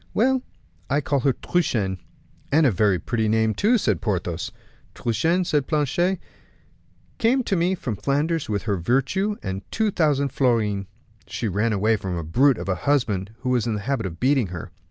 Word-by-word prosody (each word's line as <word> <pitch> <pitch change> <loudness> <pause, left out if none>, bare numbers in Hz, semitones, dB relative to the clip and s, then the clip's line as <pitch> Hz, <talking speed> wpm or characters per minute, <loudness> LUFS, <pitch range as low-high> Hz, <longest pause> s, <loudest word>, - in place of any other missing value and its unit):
"Well, 260 +3 +3 0.5
I 140 - +2
call 140 0 0
her 135 +1 +2
Truchen." 105 - -1 0.5
"And 155 +2 +4
a 130 - +5
very 100 -1 +2
pretty 110 +5 -1
name 110 0 +2
too," 225 - +3
said 105 - 0
Porthos. - - -2 0.4
"Truchen," 160 - +1
said 145 -5 0
Planchet, 165 +5 +1 1.0
"came 250 +2 +3
to 195 - 0
me 180 +2 +1
from 125 - -4
Flanders 145 - -1
with 100 -2 -1
her 105 -3 0
virtue 135 - 0
and 95 -1 -3
two 220 -2 +1
thousand 145 -6 +2
florins. 110 -7 +1 0.4
She 115 - -3
ran 105 +4 0
away 110 +2 +2
from 95 -3 -4
a 85 - -3
brute 125 - +3
of - - -6
a 95 - +2 0.2
husband 110 -7 0
who 130 - -2
was 120 -2 +1
in 110 - 0
the 105 - -4
habit 115 -2 -1
of 85 -2 -9
beating 130 -4 +2
her. 85 -2 -7
125 Hz, 180 wpm, -23 LUFS, 105-155 Hz, 1.0 s, a